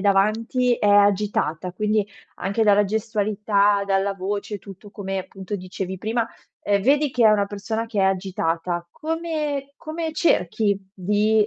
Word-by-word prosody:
davanti 215 +5 +2
è 210 - -1
agitata, 200 -4 +2
quindi 210 +2 +1 0.3
anche 210 +3 0
dalla 205 0 +5
gestualità, 210 -1 +1
dalla 195 0 +1
voce, 200 +2 -3
tutto 200 +1 -12
come 195 -1 -4
appunto 190 +1 -6
dicevi 185 0 -5
prima, 225 +3 -1 0.4
uhm, 200 -1 +2
vedi 285 +4 +3
che 240 - +3
è - - +7
una 205 -1 +3
persona 220 +3 -3
che 220 -3 -1
è - - +3
agitata. 180 -2 -1
Come 305 - -3
come 320 0 -4
cerchi 205 - +2 0.2
di 210 +3 +2
205 Hz, 140 wpm, -23 LUFS, 195-225 Hz, 0.4 s, è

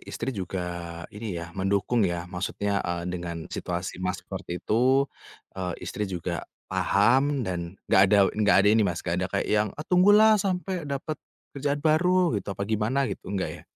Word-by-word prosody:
istri 135 - -3
juga, 90 -4 -5
ini 105 -3 -5
ya 85 0 -7
,mendukung 100 +5 0
ya, 85 0 -3
maksudnya, 95 +2 -2
eee, 85 -1 -3
dengan 85 -2 -5
situasi 90 0 -4
Mas, 90 -1 -3
seperti 90 -2 -5
itu, 130 +8 +3 0.5
eee, 90 -2 -3
istri 105 -1 -3
juga 90 -2 -3 0.3
paham 125 +9 +3
dan 90 -1 -4
enggak - - +6
ada 105 +1 +5
enggak 105 -1 +3
ada 105 - +6
ini 110 0 +4
Mas, 85 -2 -3
enggak 85 0 -1
ada 95 - 0
kayak 100 +1 -2
yang, 105 0 +3
"Ah 150 - -6
tunggulah 205 +4 +6
sampe 185 -4 -2
dapat, 140 +3 -4 0.3
kerjaan 140 +1 -1
baru," 175 +2 +3
gitu. - - -12
Apa 100 - -2
gimana 110 +6 0
gitu, - - -5
enggak 100 -2 -2
ya? - - -11
100 Hz, 175 wpm, -26 LUFS, 90-135 Hz, 0.5 s, enggak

